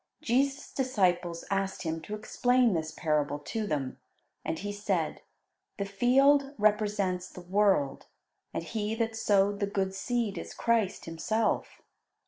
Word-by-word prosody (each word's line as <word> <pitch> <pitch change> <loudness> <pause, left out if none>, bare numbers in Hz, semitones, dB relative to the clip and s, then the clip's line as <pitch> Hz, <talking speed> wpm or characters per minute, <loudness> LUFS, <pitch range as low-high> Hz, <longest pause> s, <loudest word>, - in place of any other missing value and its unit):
'" - - -49
Jesus' 275 +3 +1
disciples 180 -9 0
asked 195 -1 -1
Him 160 -1 -2
to 210 +6 -5
explain 245 +2 +2
this 160 -2 -1
parable 150 -2 0
to 210 +9 -4
them, 140 -6 -2 0.4
and 160 - -2
He 205 +4 -4
said: 200 -5 -1 0.6
"The 200 - -1
field 275 +7 +3
represents 205 -4 +1
the 180 - -10
world, 190 -6 +1 0.4
and - - -3
He 215 +4 -2
that 225 -1 -1
sowed 205 -2 +2
the 200 - 0
good 195 -1 -1
seed 230 0 -1
is - - -8
Christ 225 -4 +1
Himself. 215 +7 -1
205 Hz, 140 wpm, -29 LUFS, 180-225 Hz, 0.6 s, field